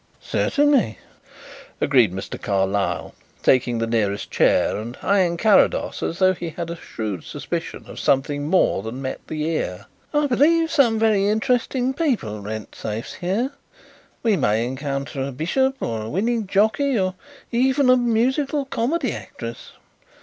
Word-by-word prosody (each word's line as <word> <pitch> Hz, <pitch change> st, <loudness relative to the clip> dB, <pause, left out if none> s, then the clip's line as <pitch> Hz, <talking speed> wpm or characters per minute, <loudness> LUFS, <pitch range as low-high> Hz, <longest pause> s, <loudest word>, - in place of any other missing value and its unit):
"Certainly," 285 Hz, -, +2 dB, 0.8 s
agreed 125 Hz, -8 st, +4 dB
Mr. 95 Hz, +1 st, -6 dB
Carlyle, 100 Hz, 0 st, -1 dB, 0.3 s
taking 125 Hz, -2 st, +3 dB
the 115 Hz, -, 0 dB
nearest 105 Hz, -3 st, -1 dB
chair -, -, +3 dB
and 115 Hz, +4 st, -6 dB
eyeing 185 Hz, -4 st, +2 dB
Carrados 210 Hz, +3 st, +3 dB
as 165 Hz, -, -2 dB
though 185 Hz, 0 st, +4 dB
he 170 Hz, -1 st, -5 dB
had 170 Hz, +1 st, -5 dB
a -, -, -4 dB
shrewd 105 Hz, -, -5 dB
suspicion -, -, -5 dB
of -, -, -9 dB
something 145 Hz, +2 st, +1 dB
more 185 Hz, -, +3 dB
than 110 Hz, +5 st, -6 dB
met 130 Hz, -, -3 dB
the 155 Hz, -1 st, -3 dB
ear. 150 Hz, -, -2 dB, 0.3 s
"I 295 Hz, 0 st, +2 dB
believe 320 Hz, +5 st, +3 dB
some 235 Hz, -6 st, +4 dB
very 215 Hz, -3 st, +3 dB
interesting 245 Hz, +4 st, +1 dB
people 240 Hz, -, -1 dB
rent 110 Hz, +1 st, -6 dB
safes 110 Hz, +2 st, -5 dB
here. 205 Hz, +10 st, -1 dB, 0.7 s
We 225 Hz, -3 st, +3 dB
may 110 Hz, -, +1 dB
encounter 140 Hz, +2 st, -4 dB
a 135 Hz, +1 st, -2 dB
bishop, 265 Hz, -, 0 dB
or 115 Hz, -, -2 dB
a 110 Hz, -, -5 dB
winning 220 Hz, -, 0 dB
jockey, 220 Hz, +7 st, +2 dB
or 185 Hz, -2 st, 0 dB, 0.4 s
even 260 Hz, +3 st, +2 dB
a 255 Hz, -, +7 dB
musical 260 Hz, +4 st, +1 dB
comedy 270 Hz, +5 st, -1 dB
actress. -, -, -8 dB
180 Hz, 145 wpm, -22 LUFS, -, 0.8 s, a